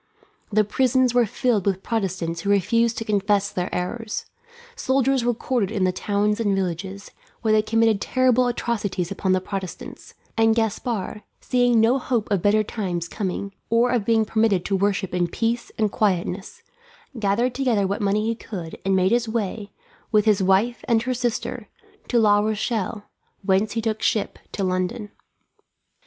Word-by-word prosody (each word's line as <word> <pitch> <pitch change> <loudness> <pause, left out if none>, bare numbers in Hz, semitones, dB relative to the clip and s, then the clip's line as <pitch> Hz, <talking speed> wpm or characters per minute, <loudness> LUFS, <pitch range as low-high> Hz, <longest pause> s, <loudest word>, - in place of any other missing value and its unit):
The 215 +1 +4
prisons 255 +3 +2
were 245 -2 +3
filled 220 -3 0
with 190 -1 0
Protestants 185 -7 -2
who 200 - -3
refused 225 +4 +2
to 225 - -3
confess 205 -1 +1
their 180 0 -2
errors; 210 +5 -3 0.5
soldiers 270 - +1
were 240 0 +1
quartered 235 -4 -1
in 195 - -1
the 185 - +3
towns 205 +3 0
and 205 -3 +1
villages, 190 +2 -4 0.3
where 220 - +2
they 215 0 +5
committed 225 -1 +2
terrible 255 -1 +3
atrocities 210 -7 -2
upon 190 -1 0
the 185 - +3
Protestants; 195 +8 -7 0.2
and 225 0 +4
Gaspard, 225 -2 -2 0.2
seeing 245 -2 +2
no 235 +5 +4
hope 240 -5 -1
of 195 -4 +2
better 210 +2 +3
times 180 -6 -3
coming, 195 +1 -4 0.2
or 235 +2 +3
of 245 -4 +1
being 225 +1 +2
permitted 215 -4 +1
to 195 - 0
worship 195 -1 0
in 180 -1 +1
peace 230 +6 -2
and 215 -2 +1
quietness, 195 - -1 0.6
gathered 220 +4 +1
together 245 -6 +1
what 200 +2 -2
money 205 +1 +1
he 230 - +1
could 185 -7 -7
and 195 0 +2
made 185 +1 +3
his 235 -1 +1
way, 215 -2 -3 0.4
with 210 -2 +3
his 210 -3 +3
wife 195 +6 +2
and 230 -2 +3
her 255 +1 -1
sister, 240 -1 -3 0.4
to 245 - +1
La 210 -2 +5
Rochelle, 215 0 -1 0.4
whence 195 +2 +2
he 225 - -1
took 220 -1 -1
ship 215 - 0
to 200 - -3
London. 185 +3 -2
215 Hz, 165 wpm, -23 LUFS, 195-235 Hz, 0.6 s, they